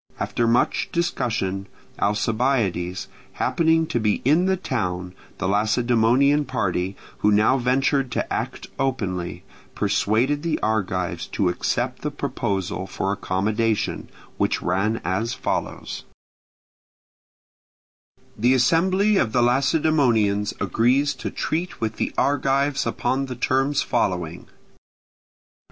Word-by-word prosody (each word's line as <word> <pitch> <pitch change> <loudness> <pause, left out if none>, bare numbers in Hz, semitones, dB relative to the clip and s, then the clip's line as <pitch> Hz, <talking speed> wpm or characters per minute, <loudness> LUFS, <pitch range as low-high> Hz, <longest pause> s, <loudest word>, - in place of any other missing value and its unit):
After 120 - 0
much 120 +1 +2
discussion, 115 - -1 0.3
Alcibiades 105 -4 0 0.3
happening 165 -1 +2
to 120 - -1
be 105 -2 +2
in 160 +7 +4
the 190 0 +2
town, 90 - -3 0.2
the 90 - -2
Lacedaemonian 120 +7 +3
party, 95 -7 -1 0.2
who 105 - +3
now 110 +6 +4
ventured 135 +2 +1
to - - -2
act - - -3
openly, 95 -10 -2 0.3
persuaded 110 +7 +1
the 165 -1 0
Argives 95 -5 -1
to 95 - 0
accept 90 - -2
the - - -1
proposal 95 -1 -3
for 95 - -2
accommodation; 105 +3 -1 0.3
which - - +1
ran 100 +5 0
as 110 +7 -1
follows: - - -3 2.3
The 125 +4 +3
assembly 185 - +3
of 110 - +1
the 125 - +3
Lacedaemonians 125 -6 +2
agrees 130 +5 +2
to - - -5
treat 170 +3 -3
with 110 -1 -2
the - - -1
Argives 140 0 +1
upon 135 +1 -1
the 130 - -5
terms 135 +3 +1
following: 90 -3 -1
1. - - -28
115 Hz, 110 wpm, -23 LUFS, 100-135 Hz, 2.3 s, in